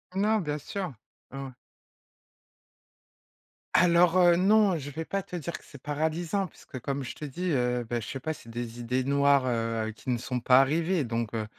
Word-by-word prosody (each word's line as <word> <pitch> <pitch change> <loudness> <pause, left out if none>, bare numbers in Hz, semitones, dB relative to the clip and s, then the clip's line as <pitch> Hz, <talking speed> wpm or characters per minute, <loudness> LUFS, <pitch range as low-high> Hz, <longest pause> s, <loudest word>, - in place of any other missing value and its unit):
Non, 215 +3 +2
bien 150 -2 -2
sûr. 185 +1 -5 0.4
Ah 135 +1 -6
ouais. 135 - -8 2.2
Alors, 175 0 +5
heu, 175 -1 +6
non, 200 -1 +4
je 145 -1 -6
vais 160 +3 -5
pas 195 0 -2
te 180 - -9
dire 170 0 -4
que - - -19
c'est 140 - -13
paralysant 160 +6 -1
puisque 135 -4 -11
comme 140 +2 -3
je - - -6
te 150 - -6
dis, 175 +6 -3
heu, 125 -3 +1
bah 120 0 -1
je 115 - -7
sais 135 - -5
pas, 155 +5 -3
c'est 115 - -14
des 120 0 -5
idées 125 +2 -1
noires, 140 0 +3
heu, 115 -2 -1
qui 115 +4 -9
ne 125 - +2
sont 125 +1 -3
pas 125 +2 +6
arrivées 160 +4 +1
donc, 115 -1 -3
heu 110 -1 -1
140 Hz, 195 wpm, -28 LUFS, 125-170 Hz, 2.2 s, heu